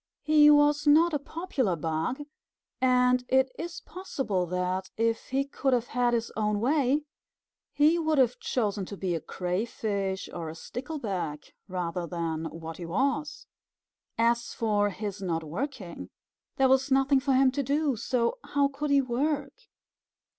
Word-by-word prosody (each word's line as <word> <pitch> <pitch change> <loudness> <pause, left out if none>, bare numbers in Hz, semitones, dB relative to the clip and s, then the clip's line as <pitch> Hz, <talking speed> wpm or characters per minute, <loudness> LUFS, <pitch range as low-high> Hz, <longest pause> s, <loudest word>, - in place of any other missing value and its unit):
He 300 -1 +6
was 295 0 +4
not 320 +3 +6
a 295 - +1
popular 275 - -2
bug, 160 - -2 0.6
and 250 -1 +4
it 265 0 +3
is 345 +1 -5
possible 265 - -3
that 180 +1 -2
if 230 0 0
he 270 +1 0
could 275 -1 -1
have 245 -1 0
had 245 -1 +2
his 230 0 -2
own 210 -1 0
way, 280 +3 +2 0.7
he 305 +4 +4
would 315 -2 +1
have 250 -2 +3
chosen 210 -5 -1
to 200 - -7
be 185 -2 -1
a 165 - -2
Crayfish 190 +2 -2
or 165 -2 -5
a 160 - -8
Stickleback, 200 - -5
rather 180 -2 -3
than 165 -2 -3
what 165 0 -7
he 175 - -6
was. 275 - -1 0.7
As 235 +1 +1
for 210 -2 +1
his 205 0 -5
not 165 -4 -1
working 195 - -5 0.5
there 270 - +4
was 265 +1 +3
nothing 270 +1 +4
for 270 0 +1
him 260 0 +5
to 280 - -1
do, 285 +1 +1
so 235 - -1
how 280 -1 +1
could 290 +2 -4
he 280 -1 +4
work? 275 +3 -1
245 Hz, 155 wpm, -28 LUFS, 190-280 Hz, 0.7 s, He